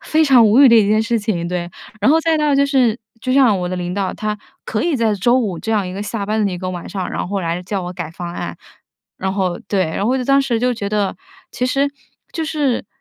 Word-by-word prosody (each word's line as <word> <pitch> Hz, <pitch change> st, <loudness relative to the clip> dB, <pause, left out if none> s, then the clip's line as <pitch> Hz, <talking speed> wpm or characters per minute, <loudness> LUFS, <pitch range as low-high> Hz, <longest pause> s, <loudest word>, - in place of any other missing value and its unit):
非 315 Hz, +1 st, +2 dB
常 250 Hz, -5 st, +6 dB
无 235 Hz, +7 st, +5 dB
语 275 Hz, -, +9 dB
的 235 Hz, -, +7 dB
一 210 Hz, -3 st, +4 dB
件 215 Hz, +1 st, +3 dB
事 230 Hz, 0 st, 0 dB
情， 200 Hz, -6 st, -2 dB
对。 175 Hz, -1 st, -3 dB, 0.3 s
然 210 Hz, -, +4 dB
后 320 Hz, -, +5 dB
再 325 Hz, -1 st, +1 dB
到 300 Hz, -2 st, +2 dB
就 280 Hz, 0 st, +4 dB
是 255 Hz, -5 st, +2 dB, 0.2 s
就 255 Hz, -, -3 dB
像 255 Hz, -8 st, +4 dB
我 180 Hz, -, -2 dB
的 185 Hz, -, -3 dB
领 180 Hz, 0 st, -3 dB
导， 195 Hz, -1 st, -2 dB
他 210 Hz, -1 st, -3 dB, 0.3 s
可 215 Hz, -, -2 dB
以 330 Hz, -4 st, +1 dB
在 225 Hz, -3 st, +1 dB
周 240 Hz, +6 st, +3 dB
五 200 Hz, -9 st, -2 dB
这 225 Hz, -, -4 dB
样 205 Hz, -3 st, +1 dB
一 180 Hz, -, -5 dB
个 200 Hz, +2 st, -4 dB
下 210 Hz, -1 st, -3 dB
班 215 Hz, +1 st, 0 dB
的 -, -, -1 dB
一 180 Hz, -, -4 dB
个 185 Hz, +1 st, -4 dB
晚 175 Hz, -2 st, -6 dB
上， 190 Hz, -3 st, -4 dB
然 -, -, -3 dB
后 200 Hz, -1 st, -2 dB
来 170 Hz, +1 st, -2 dB
叫 195 Hz, +1 st, -3 dB
我 180 Hz, 0 st, -5 dB
改 170 Hz, -3 st, -6 dB
方 170 Hz, +1 st, -7 dB
案， 85 Hz, -, -5 dB, 0.6 s
然 190 Hz, 0 st, -2 dB
后 185 Hz, -3 st, -1 dB
对。 195 Hz, -2 st, +1 dB
然 160 Hz, +5 st, -3 dB
后 235 Hz, -, +2 dB
我 -, -, +2 dB
就 250 Hz, -, -2 dB
当 275 Hz, +1 st, +4 dB
时 245 Hz, -4 st, 0 dB
就 250 Hz, +1 st, +1 dB
觉 205 Hz, -4 st, -4 dB
得， 205 Hz, -2 st, 0 dB, 0.4 s
其 250 Hz, -, -2 dB
实 280 Hz, +2 st, +1 dB, 0.4 s
就 325 Hz, -, -3 dB
是 290 Hz, -9 st, -1 dB
215 Hz, 290 characters per minute, -19 LUFS, 185-255 Hz, 0.6 s, 语